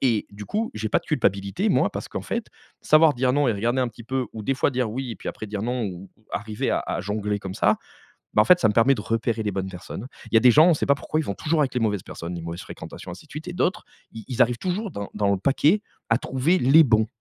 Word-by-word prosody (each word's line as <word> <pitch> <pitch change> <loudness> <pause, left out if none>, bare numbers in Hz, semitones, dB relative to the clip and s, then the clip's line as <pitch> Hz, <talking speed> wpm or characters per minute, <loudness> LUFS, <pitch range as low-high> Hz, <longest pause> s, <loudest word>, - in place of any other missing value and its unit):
et 115 -5 +2
du 105 +1 -9
coup 220 +2 -2
j'ai 110 0 -3
pas - - +3
de - - -26
culpabilité 100 0 0
moi, - - +3
parce - - -6
qu'en - - -5
fait, - - -3 0.4
savoir 155 -1 +5
dire 125 0 +1
non 145 -1 +2
et - - +3
regarder 120 +5 0
un 125 - +1
petit 115 0 -12
peu 130 +1 -2
ou 110 - -7
des 135 +5 0
fois 130 - +1
dire 125 -4 -1
oui 130 +1 -4
et - - -9
puis - - -7
après 110 - -6
dire 105 0 -4
non, 125 +1 -1
ou 95 0 -7
ou 110 - -30
arriver 105 0 -2
à - - +1
à - - -2
jongler 105 0 -2
comme 95 -1 -6
ça, - - +3 0.6
ben 105 - +6
en - - +1
fait 180 -1 +6
ça 110 - +4
me - - +2
permet 130 +4 +5
de 115 - -5
repérer 115 +1 -1
les 105 - 0
bonnes 95 0 -3
personnes. 95 +5 -8 0.2
Il - - -7
y - - +9
a - - +1
des 125 - +7
gens, 155 +6 +7
on 170 - +5
sait - - -2
pas 140 - +5
pourquoi, 155 - -2
ils 155 - -3
vont 100 - -2
toujours 155 +6 0
avec 135 -3 0
les 125 - 0
mauvaises 105 -4 0
personnes, 85 +1 -7
les 85 - -6
mauvaises 85 +2 -6
fréquentations, 90 - -9
ainsi 95 - -12
de - - -31
suite. 155 +4 -7
Et - - -4
d'autres, 185 +3 0 0.3
ils 110 -2 -9
ils 125 0 +3
arrivent 120 0 +1
toujours 190 +3 -2
dans 100 -7 -6
dans 100 -1 +1
le 100 - +1
paquet 150 - +3 0.3
à 115 - +4
trouver 140 +8 +1
les 140 +4 +6
bons. 110 -3 +3
115 Hz, 295 wpm, -24 LUFS, 105-140 Hz, 0.6 s, y